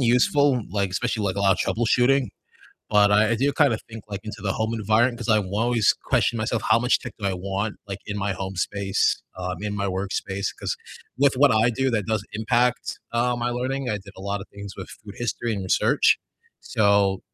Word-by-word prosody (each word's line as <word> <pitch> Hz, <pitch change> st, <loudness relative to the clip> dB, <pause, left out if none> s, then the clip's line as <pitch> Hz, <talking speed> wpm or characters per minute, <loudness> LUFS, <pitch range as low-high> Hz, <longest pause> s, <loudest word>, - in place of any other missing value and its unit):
useful, 125 Hz, +1 st, +3 dB
like, 100 Hz, 0 st, 0 dB
especially, 110 Hz, +3 st, -1 dB
like, 95 Hz, -1 st, -1 dB
a -, -, -1 dB
lot 100 Hz, -1 st, +5 dB
of -, -, -9 dB, 0.2 s
troubleshooting, 125 Hz, +2 st, +3 dB, 0.6 s
but 105 Hz, -1 st, +5 dB
I 105 Hz, +2 st, +4 dB
I -, -, +3 dB
do 135 Hz, +5 st, +1 dB
kind 145 Hz, -5 st, +3 dB
of 110 Hz, -, -5 dB
think, 115 Hz, -1 st, -9 dB
like, 100 Hz, -2 st, -5 dB
into 105 Hz, -, -7 dB
the 95 Hz, -2 st, 0 dB
home 110 Hz, +2 st, -1 dB
environment, 115 Hz, +3 st, +2 dB
'cause 120 Hz, 0 st, -6 dB
I 110 Hz, -, +5 dB
will 100 Hz, 0 st, -3 dB
always 115 Hz, -1 st, +3 dB
question 120 Hz, -, +1 dB
myself 110 Hz, +1 st, -1 dB
how 110 Hz, -, +6 dB
much 125 Hz, +1 st, +2 dB
tech 120 Hz, -, -8 dB
do 100 Hz, -, -2 dB
I 95 Hz, -, 0 dB
want, 100 Hz, +3 st, -3 dB
like, 100 Hz, -1 st, -5 dB
in 105 Hz, -, -4 dB
my 100 Hz, 0 st, -1 dB
home 95 Hz, 0 st, -5 dB
space, 95 Hz, +1 st, 0 dB
um, 90 Hz, -1 st, -4 dB
in 105 Hz, -1 st, -3 dB
my 100 Hz, -, -1 dB
workspace, 95 Hz, +1 st, -3 dB
'cause -, -, -3 dB, 0.4 s
with 140 Hz, -1 st, +4 dB
what 135 Hz, +1 st, +5 dB
I 110 Hz, +2 st, +4 dB
do, 130 Hz, +3 st, 0 dB
that 110 Hz, -5 st, -1 dB
does 110 Hz, -2 st, -1 dB
impact, 120 Hz, +3 st, 0 dB
uh, 120 Hz, +1 st, +1 dB
my 120 Hz, 0 st, -1 dB
learning, 130 Hz, +2 st, -2 dB
I 105 Hz, -, -1 dB
did 100 Hz, 0 st, -13 dB
a 95 Hz, -, -10 dB
lot 100 Hz, 0 st, -2 dB
of -, -, -10 dB
things 100 Hz, -1 st, -9 dB
with 95 Hz, -, -7 dB, 0.2 s
food 100 Hz, -1 st, -9 dB
history 120 Hz, 0 st, -2 dB
and 100 Hz, -2 st, -3 dB
research, 95 Hz, -, +3 dB, 0.4 s
so 100 Hz, -3 st, +2 dB
110 Hz, 220 wpm, -24 LUFS, 100-120 Hz, 0.6 s, how